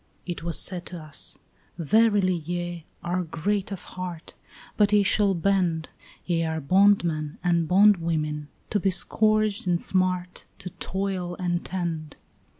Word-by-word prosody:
It 175 -2 -5
was 170 -1 -1
said 180 -2 0
to 175 - -5
us: 155 -2 -4 0.4
"Verily 205 +2 +3
ye 175 0 -4 0.2
are 175 +1 -1
great 195 +5 -2
of 195 - -6
heart, 180 -3 -7 0.4
But 210 -1 +3
ye 205 -1 +5
shall 200 0 +3
bend; 175 -3 0 0.4
Ye 170 -2 0
are 160 0 -2
bondmen 170 -2 +2
and 170 -2 +2
bondwomen, 165 -6 +3 0.2
to 210 - +2
be 195 - +1
scourged 215 +1 +1
and 175 -1 +2
smart, 180 -1 -1
To 185 -2 -8
toil 190 -2 -3
and 175 -1 -2
tend." 165 -5 -4
180 Hz, 140 wpm, -25 LUFS, 165-195 Hz, 0.4 s, ye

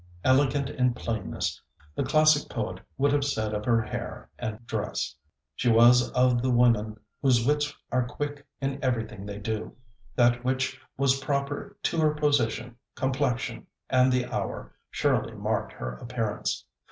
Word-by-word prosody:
Elegant 135 +1 +3
in 125 -2 +1
plainness, 110 -6 -3 0.3
the - - -2
classic 155 -1 +4
poet - - -3 0.2
would 140 +1 +3
have 145 -1 +2
said 110 -6 -1
of 105 0 -3
her 115 -1 +3
hair 120 +3 -6
and 115 0 -5
dress. - - -3 0.4
She 125 - +1
was 120 +2 +6
of 125 -1 +3
the 130 - 0
women 115 -3 +3 0.2
whose 125 -5 +3
wits 145 +1 +2 0.2
are 125 -1 +1
quick 145 +2 -5
in 135 0 -3
everything 110 -5 -2
they 100 0 -5
do. 110 +1 -4 0.4
That 120 0 +3
which 130 +1 -1 0.2
was 135 0 +3
proper 140 +8 -2
to 170 - 0
her 155 -1 +3
position, 125 -6 +1 0.2
complexion, 125 -3 -1 0.2
and 130 0 +5
the 125 -1 +2
hour, - - -4 0.2
surely - - 0
marked - - -1
her 60 0 -5
appearance. 115 -3 -2
125 Hz, 150 wpm, -27 LUFS, 115-140 Hz, 0.4 s, was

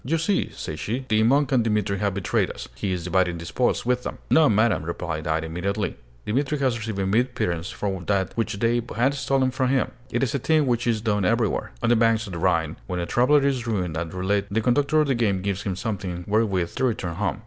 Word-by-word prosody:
"You 160 +7 0
see," 185 +5 0
said 75 -1 -6
she, 120 - -3
"the 110 -1 +3
monk 140 +6 +3
and 125 -3 +3
Dimitri 105 -3 0
have 100 -2 0
betrayed 100 - 0
us: - - -7
he 100 - -3
is 90 -2 -2
dividing 90 0 +1
the 85 - -8
spoils 120 +8 0
with 125 0 +1
them." - - -5
"No, 160 -2 +6
madam," 110 +1 +3
replied 80 -1 -4
I, 80 0 +2
immediately. 90 +5 -2 0.3
"Dimitri 140 +6 0
has 130 -4 +1
received 110 -3 -4
a 95 - 0
mere 110 +6 +3
pittance 90 -8 -3
from 95 -3 -4
that 100 -2 0
which 115 - -1
they 120 +3 +2
had 125 +5 +2
stolen 135 -1 +1
from 130 0 0
him. 130 -1 +1 0.2
It 120 - 0
is 135 +1 0
a 140 - 0
thing 155 +3 +2
which 120 -2 0
is 115 -2 +1
done 105 -2 0
everywhere. 110 - 0
On - - +2
the 120 - +5
banks 115 0 +3
of 95 - -8
the 85 - -4
Rhine, 85 -3 +1
when 90 -1 -3
a 85 - -1
traveler 140 +8 +3
is 130 -4 0
ruined 90 -8 -1
at 80 0 -3
roulette, 100 +2 0
the 110 +3 0
conductor 140 +6 +3
of 150 - +1
the 135 - +2
game 100 -6 0
gives 100 -1 -1
him 95 -3 -3
something 95 -5 -4
wherewith 100 -5 +1
to 130 - +2
return 100 -8 -1
home." 105 - -1
110 Hz, 240 wpm, -24 LUFS, 95-125 Hz, 0.3 s, No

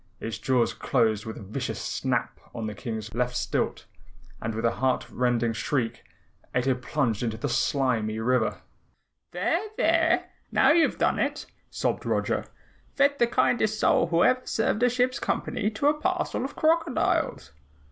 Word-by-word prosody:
Its 110 -2 -5
jaws 125 -3 +1
closed 110 -4 +1
with 110 - -6
a 115 - -9
vicious 100 - -4
snap - - -2 0.2
on 115 - -4
the 105 - -4
King's 110 +1 -6
left 125 +1 -1
stilt - - -1 0.6
and 110 0 -3
with 115 - -2
a 115 - +1
heart 130 0 0
rending 120 -2 +1
shriek 115 0 -2 0.5
Ato 130 +1 +2
plunged 125 -3 -1
into 115 -2 -2
the 130 - -2
slimy 120 -4 0
river. 120 0 0 0.7
"There, 190 - 0 0.2
there! 325 0 +2 0.2
Now 265 - +5
you've 330 +1 +3
done - - +1
it!" - - -1 0.2
sobbed - - -1
Roger. - - 0 0.5
"Fed 280 0 +3
the 235 - +4
kindest 220 -2 +1
soul - - +3
who 170 +1 +3
ever 255 0 +3
served 220 0 0
a 245 - +5
ship's 250 +1 +1
company 210 - -1
to 220 +6 -4
a - - +3
parcel 355 -3 -1
of 270 - -5
crocodiles!" 325 -2 +1
130 Hz, 155 wpm, -26 LUFS, -, 0.7 s, Now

